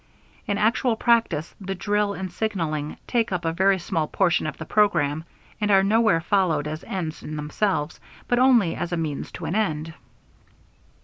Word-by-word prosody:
In 205 - 0
actual 225 +3 +2
practice 225 -10 +1
the 195 0 -4
drill 205 +2 0
and 190 -2 -5
signaling 165 -8 -2
take 235 -3 0
up 175 -2 -2
a 165 - 0
very 190 +2 +3
small 170 -3 -2
portion 175 -3 +1
of 155 - -5
the 160 - -7
program 160 -7 +2 0.4
and 210 - +1
are 195 -1 +5
nowhere 215 -4 +3
followed 165 -5 +1
as 155 +2 -5
ends 170 -5 -4
in 155 - -6
themselves, 150 +1 -1 0.3
but 245 - +2
only 245 -9 +4
as 175 0 -4
a 175 - -1
means 155 -4 -3
to - - -6
an - - -2
end. 165 -7 -1
185 Hz, 175 wpm, -24 LUFS, 160-210 Hz, 0.4 s, are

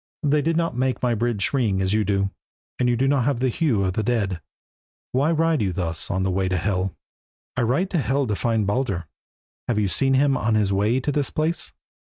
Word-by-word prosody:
"They 150 0 +3
did 165 +2 0
not 165 -6 0
make 130 +1 -1
my 125 -1 +2
bridge 115 -1 -1
ring 110 -8 +1
as 95 +1 0
you 110 0 +2
do, 100 -1 0 0.5
and 125 -1 +2
you 120 - +2
have 135 +3 +2
not 140 -2 +2
the 130 +1 +2
hue 120 -6 +1
of 95 -1 0
the 110 - 0
dead. 105 -7 -1 0.7
Why 140 +5 +2
ride 165 -2 +2
you 95 -3 +1
thus 85 -3 -3
on 95 -1 0
the 95 - 0
way 95 0 0
to 95 - 0
Hel?" 95 +1 0
He - - -1
said - - -22 0.6
"I - - +2
ride 135 +11 +1
to 175 - +1
Hel 135 +1 +1
to 105 -4 -1
find 115 -1 0
Baldur. 100 -5 -1 0.6
Have 120 - 0
you 105 -2 +2
seen 135 +7 +2
him 140 0 +3
on 110 -3 +1
his 100 -2 +2
way 105 +6 +2
to 145 - -1
that 145 -2 -1
place?" 160 +2 -1
120 Hz, 230 wpm, -23 LUFS, 100-135 Hz, 0.7 s, They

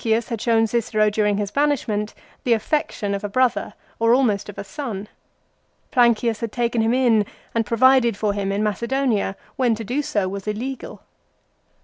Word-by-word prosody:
Plancius 225 0 +1
had 230 -3 -3
shown 225 -1 +3
Cicero 215 -2 +1
during 210 -1 +1
his 205 -1 -2
banishment 245 -8 0 0.3
the 240 - +3
affection 220 -3 -1
of 200 +1 -3
a 205 - -3
brother, 255 +2 +1 0.2
or 230 +1 +4
almost 210 -7 +1
of 205 - -9
a - - -4
son. 215 -4 -6 0.8
Plancius 235 -3 +3
had 230 -2 -4
taken 235 -1 0
him 225 +2 +2
in 235 -5 +4 0.3
and 225 -2 0
provided 235 -1 +4
for 210 -1 0
him 200 -1 -2
in 200 +2 0
Macedonia, 230 -1 0 0.2
when 245 -4 +2
to 225 - -6
do 250 +7 -1
so 205 -9 -1
was 195 +1 -6
illegal. 245 +5 -5
225 Hz, 170 wpm, -22 LUFS, 210-245 Hz, 0.8 s, or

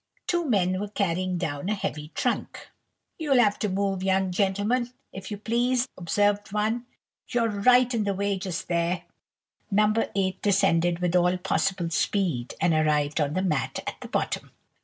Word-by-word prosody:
Two 345 -1 0
men 185 -4 +2
were 205 - -3
carrying 185 -3 -1
down 155 0 -3
a 215 - +1
heavy 155 -6 -4
trunk. - - -2 0.5
"You'll 290 -5 +2
have 210 -4 +3
to 210 - 0
move, 195 0 -1
young 190 0 +1
gentleman, 205 +6 0 0.2
if 190 0 -7
you 205 - -4
please," 240 +4 +1
observed 205 +3 0
one; 220 +3 -1 0.4
"you're 240 -2 +1
right 245 +4 +4
in 220 -3 0
the 200 -1 0
way 200 0 -1
just 185 -3 -4
there!" 170 0 0 0.7
No. 210 +1 +3 0.2
8 190 -1 0
descended 175 -4 +3
with 180 0 +1
all 180 +1 +3
possible 185 -1 -1
speed, 165 -9 0
and 170 - +3
arrived 150 -1 +2
on 145 +2 0
the 185 - 0
mat 150 -9 -1
at - - -6
the - - -7
bottom. - - -2
195 Hz, 165 wpm, -26 LUFS, 175-210 Hz, 0.7 s, right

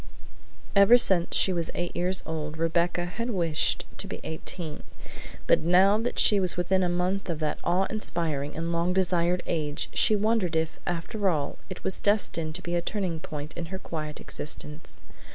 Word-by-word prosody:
Ever 200 +5 +8
since 185 -7 +5
she 190 - +3
was 170 -2 -2
eight 175 0 -3
years 180 +2 0
old 155 -1 -4
Rebecca 170 +2 0
had 230 +7 -4
wished 170 -8 +1
to - - -5
be - - -6
eighteen, 160 0 -4 0.6
but - - +4
now 185 +5 +4
that 240 +2 -3
she 205 - +5
was 185 -2 0
within 185 +2 +1
a 180 - +1
month 180 +2 -1
of 165 - -1
that 155 -1 -2
awe 180 +2 +2
inspiring 160 -9 -1
and 165 +1 -2
long 170 +2 0
desired 180 -1 +1
age 150 -3 -2
she 215 - +4
wondered 210 -5 +1
if, 160 0 -1
after 185 +4 -1
all, 150 -5 -2
it - - -8
was 190 - +1
destined 170 -6 +1
to 185 - -5
be 175 - -4
a 175 - +1
turning 180 -3 -2
point 150 -1 -7
in 170 -1 -5
her 190 +3 -5
quiet 155 -5 -6
existence. 150 +1 -5
175 Hz, 180 wpm, -27 LUFS, 160-190 Hz, 0.6 s, Ever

